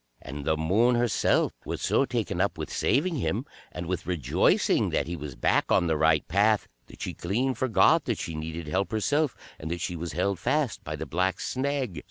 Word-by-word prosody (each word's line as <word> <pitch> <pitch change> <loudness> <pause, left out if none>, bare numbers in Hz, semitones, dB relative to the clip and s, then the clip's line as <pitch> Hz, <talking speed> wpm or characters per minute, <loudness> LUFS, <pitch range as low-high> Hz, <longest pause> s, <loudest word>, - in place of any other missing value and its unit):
And 70 +1 -7
the 80 0 +1
Moon 105 +10 +3
herself 120 -1 +2
was - - -4
so - - +2
taken - - -2
up - - 0
with - - -5
saving 160 +4 +1
him, 120 0 -1 0.3
and 90 - -6
with 90 0 -3
rejoicing 80 -9 +2
that 70 - 0
he 85 +2 -4
was 75 -5 -7
back - - +1
on - - +4
the 80 -2 +1
right 80 0 +3
path, 105 +4 +2 0.2
that - - -10
she - - -3
clean 120 +9 -1
forgot 130 -3 +3
that - - -1
she 85 - -5
needed 80 +1 -5
help 95 +6 -1
herself, 145 +6 +1 0.2
and 80 - -6
that 85 +1 -3
she 90 +1 -3
was 85 -1 -5
held 95 +3 0
fast 145 - 0
by 75 - -4
the 80 +1 -5
Black 90 +5 0
Snag. 130 - -2
90 Hz, 205 wpm, -27 LUFS, 80-120 Hz, 0.3 s, on